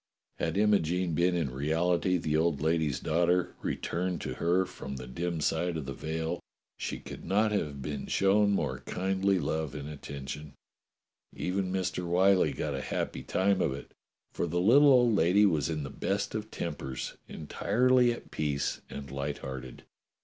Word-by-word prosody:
262 105 Hz, +2 st, +1 dB
DOCTOR 105 Hz, -7 st, +3 dB
SYN 90 Hz, +2 st, 0 dB
Had 90 Hz, -, +1 dB
Imogene 85 Hz, -3 st, -2 dB
been 90 Hz, +2 st, +2 dB
in 75 Hz, -7 st, -1 dB
reality 85 Hz, +5 st, +1 dB
the 75 Hz, -2 st, -1 dB
old 80 Hz, -2 st, +2 dB
lady's 80 Hz, -1 st, +1 dB
daughter, 90 Hz, +2 st, +1 dB
returned 90 Hz, 0 st, -2 dB
to -, -, -3 dB
her 90 Hz, +3 st, +2 dB
from 70 Hz, -, -7 dB
the 65 Hz, -1 st, -6 dB
dim 85 Hz, +7 st, -3 dB
side 80 Hz, +2 st, 0 dB
of 75 Hz, -, -4 dB
the 70 Hz, -, -4 dB
veil, 80 Hz, +4 st, -3 dB, 0.4 s
she -, -, -3 dB
could -, -, -9 dB
not 105 Hz, +4 st, +2 dB
have 75 Hz, -9 st, -2 dB
been 70 Hz, -1 st, -4 dB
shown 100 Hz, +1 st, +3 dB
more 70 Hz, -10 st, 0 dB
kindly 95 Hz, +1 st, +1 dB
love 80 Hz, -2 st, -2 dB
and 70 Hz, -1 st, -5 dB
attention. 70 Hz, 0 st, -7 dB, 0.8 s
Even 95 Hz, 0 st, -1 dB
Mr. 95 Hz, -1 st, -1 dB
Whyllie 95 Hz, +2 st, +4 dB
got 75 Hz, -, -2 dB
a 65 Hz, -, -3 dB
happy -, -, -3 dB
time 100 Hz, 0 st, +1 dB
of 65 Hz, -, +1 dB
it, 70 Hz, -, -10 dB, 0.4 s
for -, -, -1 dB
the 85 Hz, +2 st, 0 dB
little 135 Hz, +10 st, +6 dB
old 120 Hz, -3 st, +5 dB
lady 100 Hz, +3 st, +5 dB
was 80 Hz, -6 st, +2 dB
in 75 Hz, -2 st, -2 dB
the 70 Hz, -, -6 dB
best 100 Hz, 0 st, -2 dB
of 110 Hz, 0 st, -4 dB
tempers, 75 Hz, -, -4 dB
entirely 125 Hz, +10 st, +2 dB
at 120 Hz, -, -8 dB
peace 75 Hz, -2 st, -1 dB
and 70 Hz, -1 st, -7 dB
light 70 Hz, +1 st, -3 dB
hearted. 65 Hz, -2 st, -7 dB
85 Hz, 175 wpm, -30 LUFS, 75-95 Hz, 0.8 s, little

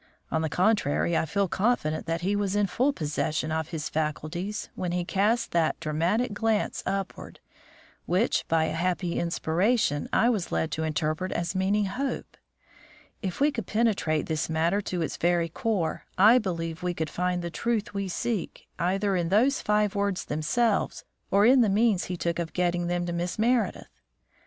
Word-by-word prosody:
On 160 Hz, -, +1 dB
the 160 Hz, -, -1 dB
contrary, 175 Hz, -3 st, +2 dB
I 160 Hz, -, +1 dB
feel 200 Hz, +4 st, +1 dB
confident 185 Hz, -7 st, 0 dB
that 165 Hz, 0 st, -1 dB
he 195 Hz, +3 st, 0 dB
was 205 Hz, -1 st, 0 dB
in 205 Hz, 0 st, +3 dB
full 250 Hz, +9 st, +1 dB
possession 155 Hz, -, -2 dB
of 160 Hz, 0 st, -1 dB
his 160 Hz, -3 st, -3 dB
faculties 160 Hz, +6 st, -3 dB
when 175 Hz, -1 st, -3 dB
he 175 Hz, -1 st, -1 dB
cast 220 Hz, +6 st, +1 dB
that 165 Hz, -2 st, +1 dB
dramatic 170 Hz, +10 st, 0 dB
glance 220 Hz, +1 st, 0 dB
upward, 195 Hz, -1 st, -4 dB, 0.7 s
which, 185 Hz, +7 st, +2 dB
by 160 Hz, -1 st, +2 dB
a -, -, -2 dB
happy 175 Hz, +1 st, -1 dB
inspiration, 170 Hz, -, +1 dB
I 230 Hz, -, +3 dB
was 205 Hz, -7 st, -2 dB
led 160 Hz, -, 0 dB
to 160 Hz, -, -2 dB
interpret 155 Hz, +3 st, -1 dB
as 170 Hz, +1 st, -2 dB
meaning 200 Hz, +2 st, +1 dB
Hope. 260 Hz, +8 st, -4 dB, 0.9 s
If 190 Hz, -5 st, -4 dB
we 290 Hz, +2 st, +4 dB
could 230 Hz, -9 st, -5 dB
penetrate 210 Hz, -9 st, +1 dB
this 160 Hz, 0 st, -2 dB
matter 165 Hz, +5 st, +1 dB
to 180 Hz, -3 st, -2 dB
its -, -, -4 dB
very 170 Hz, -1 st, +1 dB
core, 175 Hz, -3 st, -2 dB
I 215 Hz, +6 st, +7 dB
believe 165 Hz, -6 st, -3 dB
we 180 Hz, -1 st, -2 dB
should 160 Hz, -, -1 dB
find 180 Hz, 0 st, -1 dB
the 170 Hz, -, -4 dB
truth 225 Hz, +2 st, -1 dB
we 200 Hz, -1 st, -2 dB
seek 200 Hz, +1 st, -3 dB
either 195 Hz, +3 st, +1 dB
in 170 Hz, -2 st, 0 dB
those 245 Hz, +8 st, +3 dB
five 210 Hz, -1 st, +1 dB
words 200 Hz, -2 st, -1 dB
themselves 195 Hz, +9 st, 0 dB, 0.2 s
or 200 Hz, +2 st, +4 dB
in 255 Hz, +2 st, +6 dB
the 220 Hz, -, +3 dB
means 210 Hz, -2 st, +2 dB
he 180 Hz, -, -4 dB
took 170 Hz, 0 st, -1 dB
of 170 Hz, -2 st, -3 dB
getting 175 Hz, -1 st, 0 dB
them 175 Hz, 0 st, -1 dB
to 175 Hz, -, -3 dB
Miss 175 Hz, +1 st, -2 dB
Meredith. 235 Hz, +2 st, +1 dB
180 Hz, 175 wpm, -27 LUFS, 165-210 Hz, 0.9 s, I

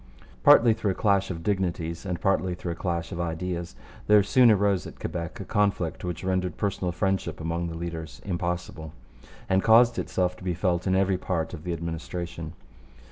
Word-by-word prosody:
Partly 115 Hz, -1 st, +7 dB
through 110 Hz, -2 st, -2 dB
a -, -, -13 dB
clash 100 Hz, -2 st, +2 dB
of 85 Hz, -3 st, -5 dB
dignities 85 Hz, -3 st, -2 dB
and 90 Hz, -2 st, -2 dB
partly 95 Hz, -2 st, +1 dB
through 90 Hz, -1 st, -5 dB
a -, -, -4 dB
clash 85 Hz, -2 st, -3 dB
of 85 Hz, -2 st, -3 dB
ideas, 85 Hz, +1 st, -3 dB, 0.3 s
there 105 Hz, -1 st, +6 dB
soon 125 Hz, +4 st, +5 dB
arose 100 Hz, -4 st, +2 dB
at -, -, -12 dB
Quebec 85 Hz, -2 st, -5 dB
a 100 Hz, -, -6 dB
conflict 100 Hz, -5 st, 0 dB
which 90 Hz, 0 st, -4 dB
rendered 95 Hz, -2 st, -1 dB
personal 95 Hz, -3 st, -1 dB
friendship 95 Hz, +2 st, -1 dB
among 85 Hz, +1 st, -2 dB
the 85 Hz, -1 st, -6 dB
leaders 80 Hz, -1 st, -6 dB
impossible, 85 Hz, -4 st, -3 dB, 0.5 s
and 95 Hz, 0 st, +3 dB
caused 115 Hz, +2 st, +5 dB
itself 90 Hz, -1 st, -1 dB
to -, -, -13 dB
be 90 Hz, -2 st, -1 dB
felt 90 Hz, 0 st, 0 dB
in 95 Hz, -, +2 dB
every 95 Hz, -1 st, +2 dB
part 85 Hz, -3 st, -2 dB
of 80 Hz, -2 st, -8 dB
the 90 Hz, -, -1 dB
administration. 85 Hz, 0 st, -5 dB
90 Hz, 185 wpm, -26 LUFS, 85-95 Hz, 0.5 s, Partly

